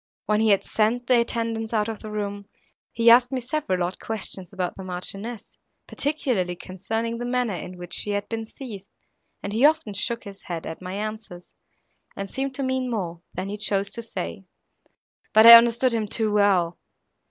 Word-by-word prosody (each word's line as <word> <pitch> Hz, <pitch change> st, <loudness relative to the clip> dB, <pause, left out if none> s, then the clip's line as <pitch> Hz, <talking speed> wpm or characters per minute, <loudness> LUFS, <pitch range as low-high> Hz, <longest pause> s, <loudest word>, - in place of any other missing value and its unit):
When 210 Hz, +1 st, +2 dB
he 220 Hz, -, +3 dB
had 200 Hz, -2 st, +3 dB
sent 225 Hz, +3 st, 0 dB
the 245 Hz, 0 st, +4 dB
attendants 230 Hz, -1 st, -2 dB
out 210 Hz, 0 st, +1 dB
of 225 Hz, -2 st, -5 dB
the 215 Hz, -, -8 dB
room, 205 Hz, -1 st, -4 dB, 0.4 s
he 230 Hz, 0 st, +5 dB
asked 245 Hz, +2 st, +6 dB
me 260 Hz, -, -1 dB
several 245 Hz, -8 st, -1 dB
odd 175 Hz, +1 st, -3 dB
questions 195 Hz, -4 st, -4 dB
about 185 Hz, -3 st, -3 dB
the 190 Hz, -, -8 dB
Marchioness, 195 Hz, +5 st, -6 dB, 0.3 s
particularly 250 Hz, -, -1 dB
concerning 225 Hz, +6 st, -4 dB
the 240 Hz, -, -3 dB
manner, 245 Hz, -3 st, 0 dB
in 180 Hz, +1 st, -7 dB
which 175 Hz, 0 st, -8 dB
she -, -, 0 dB
had 205 Hz, 0 st, -2 dB
been 225 Hz, -1 st, -4 dB
seized, 215 Hz, -7 st, -9 dB, 0.6 s
and 200 Hz, -, -4 dB
he 230 Hz, +4 st, +1 dB
often 295 Hz, -8 st, +3 dB
shook 230 Hz, +4 st, -2 dB
his 200 Hz, -1 st, -11 dB
head 170 Hz, -3 st, -6 dB
at 160 Hz, -, -7 dB
my 185 Hz, +1 st, -6 dB
answers, 215 Hz, -4 st, -6 dB, 0.6 s
and 195 Hz, 0 st, -6 dB
seemed 270 Hz, 0 st, -3 dB
to 275 Hz, -, -2 dB
mean 260 Hz, -1 st, -1 dB
more, 175 Hz, -7 st, -4 dB
than 185 Hz, +2 st, -4 dB
he 205 Hz, -, -4 dB
chose 200 Hz, -1 st, 0 dB
to 235 Hz, -, -5 dB
say. 220 Hz, -3 st, -6 dB, 0.9 s
But 220 Hz, +1 st, +7 dB
I 235 Hz, -, +13 dB
understood 235 Hz, +2 st, +7 dB
him 220 Hz, -2 st, -1 dB
too 215 Hz, 0 st, 0 dB
well. 190 Hz, -5 st, +2 dB
215 Hz, 185 wpm, -24 LUFS, 195-235 Hz, 0.9 s, I